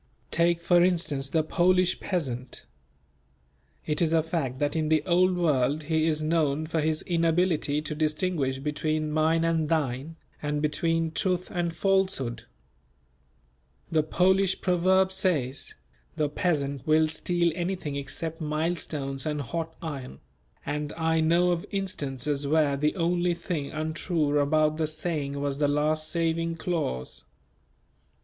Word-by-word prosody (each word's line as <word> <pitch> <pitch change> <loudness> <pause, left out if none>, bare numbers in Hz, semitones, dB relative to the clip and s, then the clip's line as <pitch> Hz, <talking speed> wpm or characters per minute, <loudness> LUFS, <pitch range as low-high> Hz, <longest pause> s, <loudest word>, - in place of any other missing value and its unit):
Take 170 0 +2
for 175 0 +4
instance 160 -7 +1
the 160 +1 +1
Polish 180 +3 +2
peasant. 130 -9 -4 1.2
It 150 +1 -1
is 165 -1 +2
a 160 -1 +3
fact 155 -6 -2
that 145 +2 -1
in 155 -1 0
the 155 -1 +3
Old 180 0 +3
World 150 -3 +1
he 160 +1 +1
is 155 -1 0
known 155 -2 +1
for 160 0 -1
his 155 0 0
inability 165 -3 +1
to 155 - -4
distinguish 155 -3 0
between 155 +2 -2
"mine 160 +2 +2
and 165 -2 +1
thine," 150 -1 -1 0.3
and 150 0 -1
between 165 +2 0
truth 180 +2 -1
and 175 -2 -1
falsehood. 185 - 0 1.5
The 160 -1 +3
Polish 190 +4 +2
proverb 185 +1 +3
says: 160 -9 -1 0.4
"The 150 -1 0
peasant 145 -5 -1
will 155 0 +4
steal 170 +2 +1
anything 175 -4 -3
except 160 +4 -4
millstones 150 -3 -2
and 150 -1 -1
hot 160 +4 -4
iron," 135 - -6 0.5
and 150 0 -3
I 160 0 +1
know 170 +3 +3
of 170 -1 -1
instances 145 -7 -2
where 150 -1 +3
the 150 +2 0
only 175 0 +1
thing 170 -4 -4
untrue 155 -1 -1
about 155 +1 +2
the 160 -1 0
saying 155 -3 -3
was 140 0 -2
the 145 - +3
last 155 +2 +1
saving 165 0 0
clause. 155 - -3
155 Hz, 135 wpm, -27 LUFS, 145-170 Hz, 1.5 s, for